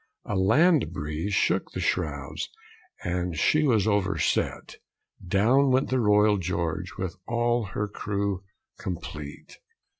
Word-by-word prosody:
A 105 - -3
land 120 - +4
breeze 80 +4 -3
shook - - +1
the - - -4
shrouds, 70 -2 -2 0.5
And 90 -2 -2
she 155 - +3
was 115 -9 +3
overset; 100 -2 0 0.5
Down 115 +10 +3
went 130 +1 +2
the 130 - +2
Royal 105 -2 +4
George, 90 +1 -3
With 95 -1 -4
all 120 0 +1
her 105 - 0
crew 100 -2 -2 0.4
complete. 75 -5 -7
100 Hz, 120 wpm, -26 LUFS, 85-115 Hz, 0.5 s, land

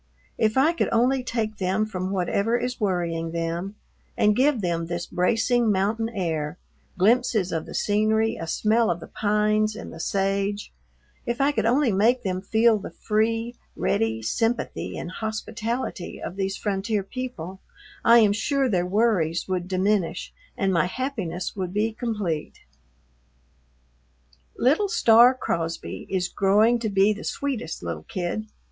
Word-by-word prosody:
If 215 +2 +2
I 300 +6 +4
could - - 0
only 250 +3 +2
take 225 -3 -2
them 190 +3 0
from 185 -3 -4
whatever 200 +4 0
is 250 0 -3
worrying 170 -4 -1
them 170 +4 -3 0.4
and 210 0 +4
give 265 +1 +3
them 170 -2 -1
this 175 0 -3
bracing 230 +6 +2
mountain 210 +4 0
air, 165 -6 -3 0.4
glimpses 215 -1 +2
of 160 -1 -3
the - - -8
scenery, 220 +2 +2
a 165 - -6
smell 220 +6 +2
of 175 - -1
the - - -9
pines 215 0 +1
and 225 - -8
the 165 - -10
sage, 195 +2 -1 0.5
if 235 0 -1
I 275 +1 +3
could 225 -5 0
only 255 +1 +3
make 230 +6 +3
them 185 -2 -2
feel 220 +2 +3
the 195 - -7
free, 225 +2 -1 0.2
ready 110 +12 0
sympathy 225 - -1
and 175 - -5
hospitality 220 0 -4
of 180 - -6
these 195 0 -2
frontier 205 0 -1
people, 195 -6 -6 0.4
I 235 +1 +7
am 215 -3 +5
sure 275 +5 +1
their 180 -6 0
worries 185 -5 +1
would 180 -2 -2
diminish 190 -1 0 0.2
and 195 -3 +1
my 165 -1 +2
happiness 190 -7 -4
would 185 -2 -4
be 215 +2 +1
complete. 210 -10 -3 2.0
Little 315 - +2
Star 240 - +6
Crosby 165 -8 -3
is 185 -2 0
growing 210 +6 +3
to 225 -2 -2
be 200 +1 +3
the 210 - -9
sweetest 250 - -3
little 85 -2 -5
kid. 185 +4 -3
210 Hz, 150 wpm, -25 LUFS, 180-230 Hz, 2.0 s, I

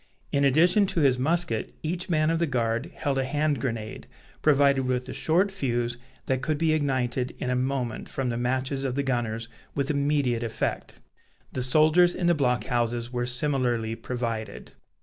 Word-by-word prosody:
In 140 - +2
addition 175 - +4
to 185 -3 -1
his 130 -3 +3
musket, 165 -3 0
each 175 +4 -3
man 155 -1 +2
of 165 - 0
the 170 - +1
guard 120 0 -1
held 145 -6 -2
a - - +1
hand 145 -1 0
grenade, 115 -4 -4 0.3
provided 140 -3 +3
with 125 -1 -1
a - - -5
short 180 +5 +2
fuse 120 -9 -1 0.3
that 130 -1 0
could 155 +2 -1
be 160 0 +2
ignited 130 -4 -1
in 125 - -2
a - - +1
moment 125 -2 -2
from 135 -2 -2
the 120 - -2
matches 130 +3 -1
of 130 -2 -2
the 140 - 0
gunners, 115 -4 -2 0.3
with 140 +1 0
immediate 140 -5 +1
effect. 115 -1 -3 0.5
The 130 - -3
soldiers 155 +7 +4
in 180 - -2
the 175 - +5
block 125 -5 +1
houses 120 0 -1
were 120 0 -1
similarly 125 -4 0
provided. 115 -3 -5
130 Hz, 175 wpm, -26 LUFS, 120-155 Hz, 0.5 s, the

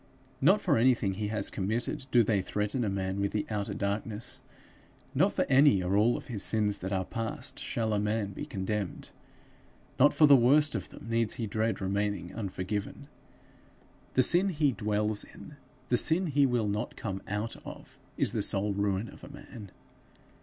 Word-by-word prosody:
Not 190 +9 +4
for 145 -9 +2
anything 115 -5 +2
he 105 +2 -3
has 110 0 -1
committed 120 +8 -2
do 120 -2 +5
they 105 -3 +1
threaten 105 +6 -2
a 105 - 0
man 95 0 -2
with 100 - -1
the 105 - -1
outer 105 -2 -2
darkness. 105 +2 -3 0.7
Not - - +3
for - - 0
any 130 -8 +5
or 90 +2 0
all 110 +4 +3
of - - -9
his 110 -5 -5
sins 105 -1 +2
that 95 +1 -5
are 95 -1 -1
past 120 +4 -4
shall 110 -2 -2
a 105 - +1
man 105 -1 -1
be - - -7
condemned; 100 0 -4 0.9
not 145 +3 +6
for 155 - +5
the 145 -1 +8
worst 145 +5 +4
of - - -4
them - - -12
needs 115 -1 0
he 115 - -3
dread 110 +2 -1
remaining 100 -2 -2
unforgiven. 105 +5 -5 1.1
The 130 - +5
sin 180 +8 +5
he 150 -5 +1
dwells 105 -2 -1
in, 150 - -13 0.3
the 120 - +3
sin 165 +9 +4
he 145 -3 +3
will 120 -4 0
not 105 +1 -3
come 95 -3 -5
out 105 +3 -3
of, - - -11 0.2
is - - +2
the - - 0
sole 100 +1 +1
ruin 100 +1 -1
of - - -14
a - - -10
man. 105 -4 -11
105 Hz, 180 wpm, -29 LUFS, 100-125 Hz, 1.1 s, the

